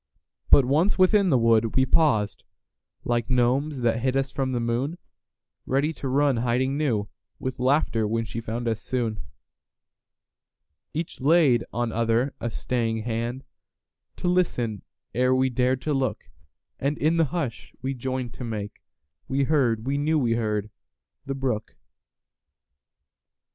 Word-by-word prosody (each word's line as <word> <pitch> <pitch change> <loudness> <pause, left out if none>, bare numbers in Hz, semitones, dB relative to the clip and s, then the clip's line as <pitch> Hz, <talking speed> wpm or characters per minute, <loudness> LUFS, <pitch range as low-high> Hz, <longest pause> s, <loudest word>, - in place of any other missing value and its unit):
But 140 - +7
once 155 +10 +2
within 190 +1 +4
the 135 - +4
wood, 115 -1 +3
we 130 - +4
pausedLike 120 -3 -1
gnomes 130 +3 +1
that 115 -1 +1
hid 130 +1 +1
us 135 0 -1
from 135 -2 -1
the 125 - -1
moon, 120 +8 -1 0.7
Ready 140 +4 +1
to 140 - -5
run 140 0 +2
to - - 0
hiding 125 +3 +1
newWith 120 -3 -3
laughter 125 -4 +2
when 115 +1 -1
she 115 +1 -5
found 115 +2 -4
us 110 -1 -1
soon. 115 -4 -2 1.7
Each 160 -3 -5
laid 145 -5 +4
on 120 -1 -1
other 115 +4 +1
a 120 - -2
staying 115 -1 -2
handTo 120 +3 -3 0.8
listen 160 - 0 0.3
ere 125 +1 +3
we 130 0 +2
dared 125 +1 +1
to 150 - 0
look, 135 -4 -2 0.5
And 140 +2 -1
in 160 +3 +2
the 165 - +4
hush 140 -7 -4
we 135 +1 -1
joined 130 -1 -4
to - - -8
makeWe 105 - -5
heard—we 135 -2 +1
knew 155 +2 +2
we 125 -6 +1
heard—the 110 +5 -5
brook. 125 -5 -3
125 Hz, 135 wpm, -25 LUFS, 115-140 Hz, 1.7 s, But